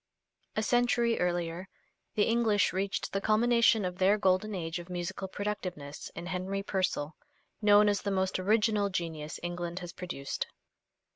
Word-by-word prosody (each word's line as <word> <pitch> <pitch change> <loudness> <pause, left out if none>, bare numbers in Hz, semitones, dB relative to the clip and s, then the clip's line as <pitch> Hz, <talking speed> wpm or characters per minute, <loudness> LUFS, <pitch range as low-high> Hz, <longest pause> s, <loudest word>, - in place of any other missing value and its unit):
A 220 - +1
century 240 0 +2
earlier 175 +1 -1 0.5
the 210 - +4
English 225 -3 +2
reached 195 +1 -2
the 195 - 0
culmination 230 0 +4
of 180 0 -4
their 195 +3 +4
Golden 195 +1 +2
Age 165 0 -3
of 175 +1 -10
musical 180 +2 -4
productiveness 185 -8 -5
in 170 - -6
Henry 185 +2 -3
Purcell, 185 -6 -1 0.5
known 210 0 +6
as 205 -1 +2
the 205 - -2
most 190 -1 0
original 210 +1 +2
genius 160 -5 -4
England 175 0 -4
has 175 -2 -6
produced. 175 -7 -4
190 Hz, 145 wpm, -30 LUFS, 175-210 Hz, 0.5 s, known